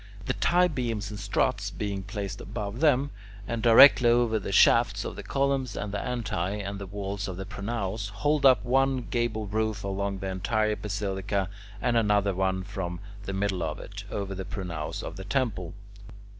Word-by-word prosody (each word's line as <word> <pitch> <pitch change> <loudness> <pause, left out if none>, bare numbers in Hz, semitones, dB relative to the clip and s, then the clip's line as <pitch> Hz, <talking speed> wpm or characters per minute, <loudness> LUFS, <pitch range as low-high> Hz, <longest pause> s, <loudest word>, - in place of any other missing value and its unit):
The 130 - 0
tie 180 +5 +3
beams 120 -9 -3
and 105 - -6
struts, - - 0
being 100 -2 -3
placed 100 0 -5
above 105 +3 -5
them, 145 -2 +3 0.4
and 115 -1 -2
directly 120 +2 +8
over 120 -2 +3
the 100 - -5
shafts 105 0 +4
of - - -5
the - - -6
columns 135 +2 0
and 100 - -3
the 100 - -2
antae 105 -5 -2
and 100 0 -5
walls 100 0 -4
of 95 -2 -5
the 95 - -5
pronaos, 105 0 -3
hold 145 +9 0
up 130 -2 +6
one 135 +1 +2
gable 120 -3 0
roof 110 0 -1
along 100 0 -2
the 95 0 -4
entire 105 +3 0
basilica, 100 -2 -2 0.3
and 120 +2 +1
another 105 -3 +2 0.3
from 95 -3 -4 0.3
the 100 - -3
middle 95 -2 -1
of 80 -2 -2
it, - - -8
over 100 -1 -3
the 95 0 -5
pronaos 85 -7 -5
of - - -6
the 95 - -6
temple. 105 -8 -1
105 Hz, 170 wpm, -27 LUFS, 100-120 Hz, 0.4 s, directly